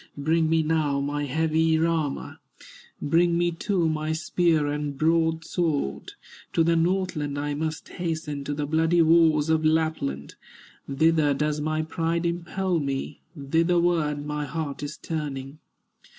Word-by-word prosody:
Bring 160 +2 +1
me 160 0 +3
now 155 -3 +1
my 145 +1 -2
heavy 160 +3 +1
armor, 160 -3 -1 0.6
Bring 170 +3 +2
me 175 0 +1
too 175 0 0
my 155 0 -1
spear 160 -1 +1
and 145 -1 -3
broadsword; 160 - 0 0.4
To 165 - +3
the 170 +1 +2
Northland 165 -4 0
I 145 0 -2
must 160 +2 -4
hasten, 160 -5 -4
To 145 +1 -3
the 145 0 -2
bloody 160 +3 +3
wars 160 -2 +4
of 160 0 +2
Lapland, 155 - 0 0.6
Thither 155 0 +3
does 150 +1 -1
my 155 +1 -1
pride 165 +1 -1
impel 175 +1 -1
me, 135 -2 -4 0.2
Thitherward 165 0 +1
my 150 0 -3
heart 150 -1 -4
is 145 +1 -5
turning. 145 -3 -5
160 Hz, 135 wpm, -25 LUFS, 145-165 Hz, 0.6 s, wars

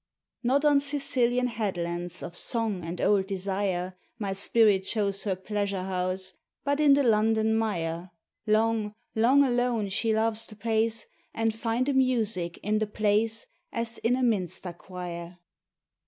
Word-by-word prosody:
Not 270 +4 +2
on 290 -1 +5
Sicilian 255 -4 0
headlands 175 -6 -3
of 170 - -6
song 220 -4 0
and 170 +2 -5
old 195 -2 +2
desire, 190 -1 -2 0.2
My 200 -4 -2
spirit 200 0 +4
chose 200 -1 0
her 195 -2 0
pleasure 200 0 -3
house, 185 0 -2 0.3
but 285 +1 0
in 290 -2 +6
the 285 - +2
London 220 -1 +3
mire: 175 -6 -2 0.4
Long, 215 -1 +1 0.2
long 255 +6 +5
alone 245 -5 +1
she 220 +4 +1
loves 220 0 0
to 215 - -10
pace, 225 +1 0 0.3
And 225 -1 +1
find 230 +3 -1
a 285 - +1
music 225 -10 +1
in 215 +1 +1
the 215 - -1
place 215 +2 0 0.3
As 230 0 -4
in 240 +2 +2
a 260 - -1
minster 185 -6 -1
choir. 175 -1 -8
215 Hz, 145 wpm, -27 LUFS, 190-230 Hz, 0.4 s, in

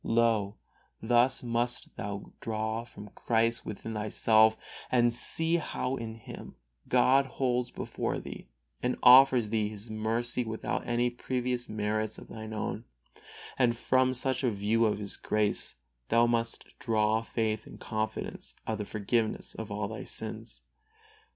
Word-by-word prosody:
Lo! 115 -3 +2 0.4
thus 120 +3 +3
must 120 0 -2
thou 100 0 -5
form 110 -1 -4
Christ 115 0 +1
within 110 +2 -5
thyself 110 +1 +4 0.3
and 120 -1 +4
see 165 +7 +1
how 135 -4 -2
in 115 -3 -5
Him 115 - -10 0.3
God 130 +2 +5
holds 125 -2 0
before - - -3
thee - - -8 0.3
and 125 - 0
offers 125 -3 +8
thee 110 -1 +1
His 110 +1 -8
mercy 115 +3 0
without 110 -1 -3
any 120 +1 +1
previous 125 0 -2
merits 110 0 -1
of - - -12
thine 110 0 -7
own, 110 +1 -3 0.7
and 120 -2 +3
from 130 +1 +2
such 130 +2 -1
a 125 - +3
view 110 +2 +2
of 105 - +1
His 105 -1 -5
grace 105 -1 0 0.4
must 115 0 +2
thou - - -22
draw 110 -1 +2
faith 110 -2 -2
and - - -11
confidence 110 -1 -4
of 110 -1 -2
the 105 - -2
forgiveness 110 +2 -1
of 110 -2 -7
all 105 0 -2
thy 110 +2 -6
sins. 110 +1 -6
115 Hz, 140 wpm, -30 LUFS, 110-120 Hz, 0.7 s, offers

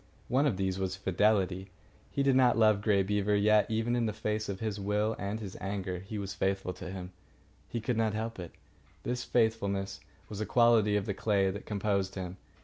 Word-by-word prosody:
One 135 +4 +3
of 105 - 0
these 95 -1 -1
was 95 -1 -1
fidelity. 95 -1 +1 0.4
He 140 - 0
did 135 -1 +4
not 125 -2 +5
love 110 -2 +4
Grey 100 -2 +3
Beaver, 105 +1 +1
yet, 105 +1 +4
even 115 +2 0
in 120 -2 +1
the 105 - -2
face 110 0 -2
of 95 -1 -4
his 110 -2 -3
will 105 +2 0
and 100 +2 -3
his 100 -4 -7
anger, 95 -2 -3
he 95 +4 -7
was 100 -1 -4
faithful 95 -1 -1
to 90 0 -8
him. 90 -1 -6 0.6
He 120 - -2
could 115 +1 -1
not 110 -2 +1
help 115 -1 -3
it. 85 -2 -7 0.5
This 125 0 -2
faithfulness 100 -4 0 0.3
was 105 0 -6
a - - 0
quality 115 -3 +4
of 105 - 0
the 100 - -1
clay 100 -1 +1
that 100 +2 -8
composed 100 -2 -1
him. 90 -1 -5
105 Hz, 205 wpm, -31 LUFS, 95-110 Hz, 0.6 s, not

